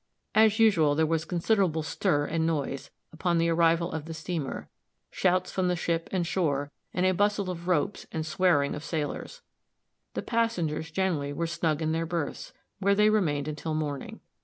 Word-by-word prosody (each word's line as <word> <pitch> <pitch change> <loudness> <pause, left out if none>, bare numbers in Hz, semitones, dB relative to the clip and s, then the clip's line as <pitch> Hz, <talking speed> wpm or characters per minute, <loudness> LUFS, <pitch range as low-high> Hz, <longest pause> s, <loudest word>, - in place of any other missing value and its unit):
As 220 -1 +5
usual, 175 -10 +4
there 160 +1 +3
was 165 0 0
considerable 175 -2 +1
stir 145 -1 0
and 160 +1 0
noise, 140 -4 -2 0.2
upon 170 +1 0
the 165 0 +2
arrival 165 +1 +3
of 160 -2 -4
the 165 0 -6
steamer, 160 -3 -4 0.4
shouts 185 0 +1
from 185 -1 0
the 180 - +1
ship 170 -1 -1
and 185 -3 0
shore, 145 -5 0 0.2
and 180 - 0
a 185 - +4
bustle 205 0 +1
of 170 0 -7
ropes 180 +3 0
and 160 -1 -3
swearing 160 -3 +2
of 150 - -6
sailors. 160 - -4 0.7
The - - -2
passengers 175 -10 -1
generally 160 -5 -1
were 170 +3 -1
snug 160 -1 -1
in 155 - 0
their 165 +1 -1
berths, 165 -3 -3 0.3
where 200 0 +3
they 210 +1 +5
remained 150 -9 +1
until 155 +1 -3
morning. 145 -3 -4
165 Hz, 175 wpm, -28 LUFS, 155-185 Hz, 0.7 s, As